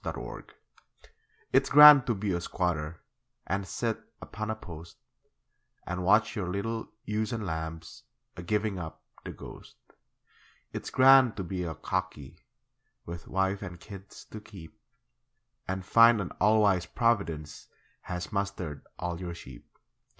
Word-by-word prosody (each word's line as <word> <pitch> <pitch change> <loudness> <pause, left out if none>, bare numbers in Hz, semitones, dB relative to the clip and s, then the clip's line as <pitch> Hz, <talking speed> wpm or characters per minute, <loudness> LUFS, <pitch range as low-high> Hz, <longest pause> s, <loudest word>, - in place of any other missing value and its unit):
It's - - -2
Grand - - -9 1.0
It's - - +4
grand 150 -2 +10
to 120 - +1
be 100 -1 -2
a 85 - -1
squatter 85 -3 -2 0.4
And 100 0 -2
sit 115 +1 -2 0.2
upon 110 0 -6
a 110 - -1
post, 85 -5 -11 0.9
And 90 +1 -4
watch 105 +6 +3
your 95 -5 -3
little 110 +4 -3 0.2
ewes 105 +1 -2
and 115 -3 -3
lambs 80 +6 -6 0.3
A 90 - -7
giving 105 +2 -1
up 80 -2 -8 0.2
the - - -6
ghost. - - -12 1.0
It's - - -5
grand 130 -3 +6
to 100 - -3
be 90 +1 -4
a 80 -2 -4
'cockie' 95 -4 -4 0.7
With 85 0 -8
wife 95 +1 0
and 90 -4 -8
kids 95 +1 -12
to 110 - -8
keep, 100 -3 -13 0.9
And 95 0 -4
find 115 +1 +6
an 100 - -4
all 110 +1 +5
wise 95 -3 +2
Providence 90 -10 -1 0.4
Has 90 0 -4
mustered 95 -7 -3
all 90 -1 -4
your 85 -2 -5
sheep. 65 -6 -13
95 Hz, 145 wpm, -29 LUFS, 85-110 Hz, 1.0 s, grand